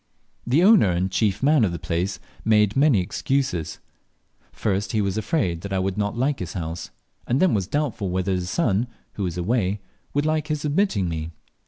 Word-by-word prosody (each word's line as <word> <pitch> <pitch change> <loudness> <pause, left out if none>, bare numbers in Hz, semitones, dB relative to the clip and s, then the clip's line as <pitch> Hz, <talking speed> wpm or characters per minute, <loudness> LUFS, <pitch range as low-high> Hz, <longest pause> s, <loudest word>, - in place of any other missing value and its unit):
The 140 +8 +4
owner 200 - +6
and 90 +2 0
chief 105 +2 0
man 145 -2 +5
of 100 - +2
the 85 - -3
place 90 +4 -2 0.2
made 105 -2 +3
many 135 -7 +4
excuses. 130 - -1 0.7
First, 100 -1 -1
he 110 - +2
was 100 -2 0
afraid 100 - -1
I 95 - 0
would 95 0 -1
not 105 +2 -2
like 135 +3 0
his 90 -2 -5
house, 85 -2 -5 0.4
and 125 - +1
then 185 -1 +4
was 95 -4 0
doubtful 120 -8 -1
whether 95 +1 -1
his 90 -1 -1
son, 115 - +1 0.3
who - - -6
was 90 -3 -2
away, 100 +1 0 0.4
would 145 +1 +2
like 155 -1 0
his 150 -1 -2
admitting 145 - +1
me. 80 -1 -3
105 Hz, 185 wpm, -24 LUFS, 90-135 Hz, 0.7 s, owner